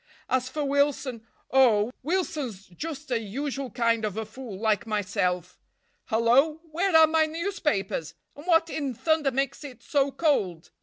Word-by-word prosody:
As 255 0 0
for 295 +2 -2
Wilson—oh, 260 -4 +1
Wilson's 290 - -2
just 290 - -7
a 235 - +2
usual 270 +5 -4
kind 230 0 +1
of 210 -1 -2
a 220 - -2
fool, 220 -2 -9
like 220 +1 +1
myself. 185 -4 -1 0.5
Hello, 250 +7 +3
where 345 +2 +3
are 320 - +9
my 315 0 +2
newspapers—and 295 - -3
what 330 -2 +3
in 275 -5 -3
thunder 315 +1 +2
makes 275 +3 -2
it 270 -4 -10
so 280 -1 +1
cold? 195 - 0
265 Hz, 140 wpm, -27 LUFS, 220-300 Hz, 0.5 s, are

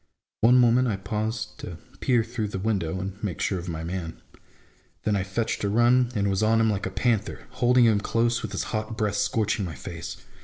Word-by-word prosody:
One 120 +3 +6
moment 125 +1 +4
I 110 - 0
paused 105 +2 -3
to 85 - -7 0.2
peer 120 -3 +2
through 115 -1 -3
the 100 - -5
window, 95 -4 -1
and 95 +2 -6
make 95 -6 -3
sure 95 - 0
of 90 +1 -6
my 80 -1 -4
man. 85 -1 -5 0.8
Then 105 - +1
I 100 - +1
fetched 105 +5 -2
a 100 - +1
run, 120 +3 +4
and 100 -1 +1
was 95 0 0
on 110 +1 +3
him 110 -1 +3
like 100 -2 -2
a - - -3
panther, 110 +1 -1
holding 125 0 +4
him 110 -3 +4
close, 115 +3 +1
with - - -5
his - - -2
hot 110 +1 -3
breath 105 -2 0
scorching 105 0 0
my 85 -4 -5
face. - - -7
105 Hz, 215 wpm, -26 LUFS, 95-115 Hz, 0.8 s, One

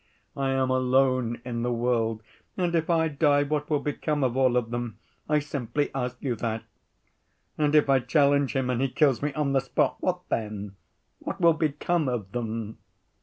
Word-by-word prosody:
I 135 -1 -1
am 135 -1 +1
alone 130 -2 +2
in 120 -2 -3
the 120 +1 0
world, 115 -2 0 0.3
and 175 -2 0
if 165 -1 0
I 165 -1 +3
die, 145 -1 +3
what 150 0 -2
will 150 -2 +1
become 145 0 -1
of 125 -2 0
all 130 -2 +3
of 115 -2 -1
them? 120 -3 -4 0.3
I 150 - +4
simply 145 -1 -2
ask 125 -1 -3
you 130 -4 0
that. 110 0 -3 0.9
And 150 0 +1
if 150 - +5
I 135 -1 +4
challenge 140 0 +2
him 130 -1 +1
and 125 0 -1
he 135 - +1
kills 135 -2 +2
me 145 +1 -1
on 145 -3 0
the 135 - +3
spot, 135 - 0
what 180 -1 -1
then? 105 -2 -3 0.4
What - - -5
will 170 -2 +5
become 155 0 0
of 110 -6 -4
them? 115 -2 -4
135 Hz, 185 wpm, -26 LUFS, 120-150 Hz, 0.9 s, if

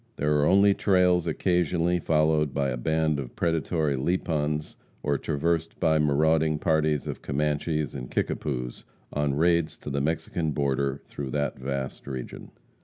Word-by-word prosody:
There 75 +1 +1
are 75 - +3
only 100 +1 +5
trails 90 -3 +3
occasionally 90 +1 +1
followed 75 -3 +2
by 70 -1 +1
a 65 - -2
band 80 +3 +1
of 65 -3 -7
predatory 80 -2 0
Lipans, 75 0 -1 0.3
or 70 -1 0
traversed 80 +2 -1
by 80 -1 +3
marauding 75 +1 +2
parties 75 -3 +1
of - - -5
Comanches 75 0 -1
and 65 -2 -6
Kickapoos, 60 -4 -3 0.3
on 75 -1 0
raids 85 +1 +2
to 75 - -7
the 70 0 0
Mexican 80 +1 -1
border 70 -1 -1
through 70 -2 -6
that 70 0 -2
vast 65 0 -4
region. 65 -3 -6
75 Hz, 145 wpm, -26 LUFS, 70-80 Hz, 0.3 s, only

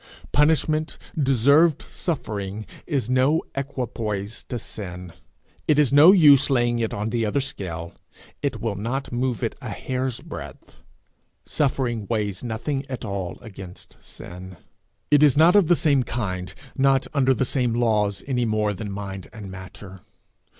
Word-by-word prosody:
Punishment, 155 +1 +2 0.2
deserved 140 +3 +4
suffering, 105 - -4 0.2
is 140 -8 -1
no 130 +5 +2
equipoise 115 -6 -4
to 125 - -2
sin. 90 -5 -6 0.5
It 150 - +4
is 145 -3 +3
no 150 +6 +9
use 150 -8 +7
laying 120 -3 +2
it 115 -1 -1
in 105 +2 -3
the 115 0 0
other 110 +6 0
scale. 85 -10 -5 0.5
It 140 -6 -2
will 115 -1 -2
not 120 +7 -3
move 125 -2 -1
it - - -1
a - - -6
hair's 130 -1 -3
breadth. - - -10 0.7
Suffering 125 -7 -1
weighs 105 -3 -2
nothing 125 +4 -3
at 130 -2 -5
all 100 -3 -4
against 95 -5 -11
sin. 90 +1 -10 0.5
It 145 -1 +6
is 145 -2 +5
not 165 +4 +6
of 200 -5 +5
the 175 - +5
same 145 -5 +3
kind, 95 -8 -3 0.2
not 135 0 +3
under 135 -2 +3
the 130 - 0
same 125 -2 0
laws, 105 -4 +1
any 125 -3 0
more 110 -1 0
than 100 +1 -6
mind 100 -1 -6
and 105 -4 -9
matter. 95 0 -10
120 Hz, 150 wpm, -24 LUFS, 100-140 Hz, 0.7 s, no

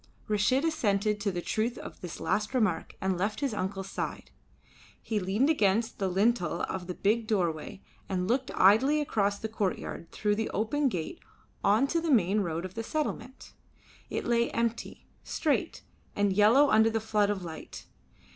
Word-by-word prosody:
Reshid 215 +7 +2
assented 210 -9 +1
to 200 -1 -1
the 175 -1 -4
truth 225 +2 -1
of - - -9
this 175 -3 -7
last 210 +5 -1
remark 215 -9 0
and 190 -2 -1
left 205 +3 -1
his 275 -5 0
uncle's 195 -1 -4
side. - - -5 0.7
He 220 -2 -2
leaned 200 +8 +1
against 225 -6 +1
the 195 - 0
lintel 190 -2 +1
of 180 -2 -4
the 180 - -4
big 220 +2 +1
doorway 185 -1 -1 0.3
and 185 -1 -1
looked 255 +4 0
idly 250 +11 +5
across 205 -8 0
the 220 - -4
courtyard 200 -5 -3
through 210 -1 0
the 220 - -1
open 270 +7 0
gate 180 - -4 0.4
on 215 +7 +4
to 335 +4 0
the 330 - -2
main 210 - +3
road 170 -3 -2
of 185 - -7
the 225 - -4
settlement. 265 -2 -4 0.6
It - - -3
lay 235 0 +2
empty, 230 0 -3 0.2
straight, 305 -3 -1 0.3
and 205 -1 +2
yellow 225 +9 +5
under 220 +1 +5
the 225 0 0
flood 210 -2 +1
of 200 -3 -2
light. 160 -2 -8
210 Hz, 170 wpm, -29 LUFS, 190-235 Hz, 0.7 s, idly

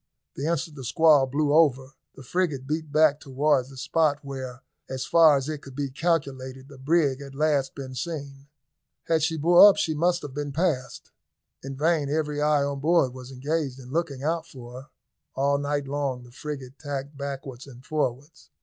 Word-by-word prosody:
The 140 - -3
instant 165 -1 -2
the 135 - -7
squall 150 0 +4
blew 145 +2 0
over, 140 -4 +3 0.2
the 135 - -12
frigate 150 -3 -1
beat 155 +1 -3
back 155 -1 +4
towards 135 -1 +1
the 135 - -13
spot 155 +1 +1
where, 130 -2 -7 0.3
as 130 0 -4
far 160 -4 +6
as 135 0 -3
it 155 -2 -4
could 135 -3 -12
be 140 -1 -3
calculated, 135 -4 -2
the 140 -2 -13
brig 140 -1 +1
had 140 -1 -10
last 145 -2 +1
been 135 -2 -7
seen. 140 -1 -6 0.6
Had 165 -1 +1
she 160 +1 0
bore 175 +6 +8
up 200 - +1
she 160 - 0
must 175 +3 +1
have 145 - -7
been 145 0 -4
passed. 150 -5 -2 0.5
In 135 0 -7
vain 155 -1 +1
every 150 -1 -1
eye 150 -1 +3
on 140 0 -3
board 155 -3 +2
was 130 0 -10
engaged 140 0 -2
in 130 -1 -11
looking 145 -4 -2
out 165 +2 -1
for 120 -2 -11
her. 135 - -17 0.5
All 140 +1 +1
night 145 -1 -2
long 135 -3 -2
the 120 - -15
frigate 135 -1 -7
tacked 145 -1 -5
backwards 135 -2 -6
and 125 -1 -14
forwards. 145 +1 -3
140 Hz, 185 wpm, -26 LUFS, 135-155 Hz, 0.6 s, bore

